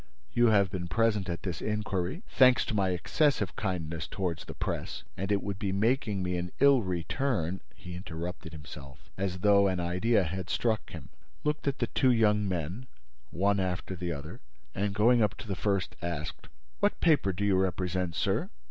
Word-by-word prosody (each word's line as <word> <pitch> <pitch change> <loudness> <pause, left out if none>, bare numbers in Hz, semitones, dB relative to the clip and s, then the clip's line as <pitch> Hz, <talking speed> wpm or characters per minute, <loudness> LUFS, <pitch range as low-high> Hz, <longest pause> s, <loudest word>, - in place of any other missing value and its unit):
You 120 0 +5
have 100 -4 +4
been 90 -2 -3
present 105 -1 +1
at 85 -1 -4
this 90 -4 -3
inquiry, 105 - -2
thanks 130 -1 +5
to - - -3
my 100 -3 +2
excessive 105 - +1
kindness 85 -6 -3
toward 90 -5 -2
the - - -9
Press, - - -3
and 95 +3 -3
it 100 - +1
would 100 -1 -4
be 100 -2 -1
making 105 -1 +1
me 90 0 -1
an 90 0 -4
ill 140 -2 +6
return—" 95 - -1
He 90 - -9
interrupted 85 -1 -6
himself, 70 -3 -11
as 95 -1 -3
though 100 -1 +5
an 95 -2 0
idea 90 +5 +2
had 90 +2 -4
struck 110 -2 0
him, - - -9 0.3
looked 150 -1 -1
at 140 - +1
the - - +1
two 130 -2 +2
young 105 -3 +3
men, 90 +8 -3 0.4
one 100 +5 +1
after 95 0 -2
the 90 -1 -3
other, 75 -1 -7 0.3
and, 100 +1 -1
going 115 +3 +5
up 105 -4 +2
to 110 - -9
the 95 - -2
first, 100 -1 -1
asked: 85 -1 -4 0.3
"What - - +1
paper 150 - +3
do 100 +3 -2
you 100 -2 +3
represent, 90 -2 0
sir?" - - 0
95 Hz, 185 wpm, -30 LUFS, 90-105 Hz, 0.4 s, ill